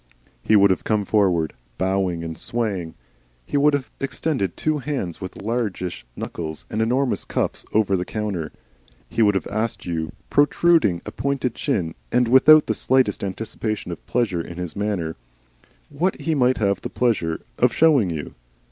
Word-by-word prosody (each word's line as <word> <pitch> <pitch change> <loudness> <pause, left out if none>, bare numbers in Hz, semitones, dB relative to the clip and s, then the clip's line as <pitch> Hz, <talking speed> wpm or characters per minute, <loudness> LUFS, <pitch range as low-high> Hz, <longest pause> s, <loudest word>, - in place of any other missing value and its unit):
He 110 - +4
would 100 -1 +6
have 95 - 0
come 105 -2 0
forward, 90 -7 +2 0.2
bowing 95 -3 0
and 80 -1 -5
swaying, 100 -8 -3 0.5
he - - -5
would 145 +1 +4
have 140 -2 -4
extended 135 - -2
two 155 -1 0
hands 135 - -4
with 95 +1 -7
largish 100 - -3
knuckles 80 -2 -6
and 110 - 0
enormous 125 +4 +1
cuffs - - -2
over 105 -2 +2
the 90 - 0
counter, 100 -4 -3
and - - -10 0.6
he 115 - -1
would 105 -2 +4
have 95 - 0
asked 110 +3 -3
you, 80 -3 -2 0.2
protruding 145 - +3
a 105 - -5
pointed 135 -1 -1
chin 80 -7 -1 0.2
and 125 -1 +3
without 150 +4 +7
the - - 0
slightest 130 -7 +1
anticipation 110 0 -4
of 85 - -7
pleasure 105 -8 0
in 85 +1 -9
his 90 -2 -5
manner, 100 -7 -2 0.7
what 170 +7 0
he 165 - 0
might 130 -3 +3
have 100 -2 +1
the - - -4
pleasure 105 -9 0 0.2
of - - +4
showing 145 - +4
you. 80 -3 -5
105 Hz, 165 wpm, -23 LUFS, 90-125 Hz, 0.7 s, without